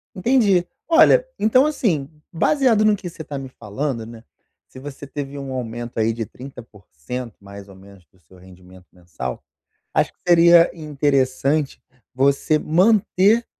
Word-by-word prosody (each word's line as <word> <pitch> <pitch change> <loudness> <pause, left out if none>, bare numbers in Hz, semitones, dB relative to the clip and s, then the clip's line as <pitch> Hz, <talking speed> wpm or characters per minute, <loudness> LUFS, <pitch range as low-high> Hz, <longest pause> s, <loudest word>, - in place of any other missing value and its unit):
Entendi. 200 -4 +2 0.2
Olha, - - +5
então 255 +6 +4
assim, 180 - -1 0.2
baseado 225 - +2
no 210 -1 +4
que 180 -2 -8
você 160 - -10
tá 145 -1 -7
me 135 -1 -7
falando, 115 +1 -5
né, 115 0 -12 0.4
se 130 - -13
você 140 0 -9
teve 140 0 -7
um 135 -1 -7
aumento 120 -2 -5
aí 110 +1 +1
de 115 0 -4
30%, 120 - -10
mais 100 0 -12
ou 95 - -15
menos, 95 -2 -17
do 95 - -32
seu 90 +3 -21
rendimento 90 0 -17
mensal, 80 -9 -7 0.5
acho - - +1
que - - -47
seria 170 0 +6
interessante 140 -1 -1 0.3
você 140 +3 +1
manter 200 +6 +2
135 Hz, 145 wpm, -20 LUFS, 110-175 Hz, 0.5 s, seria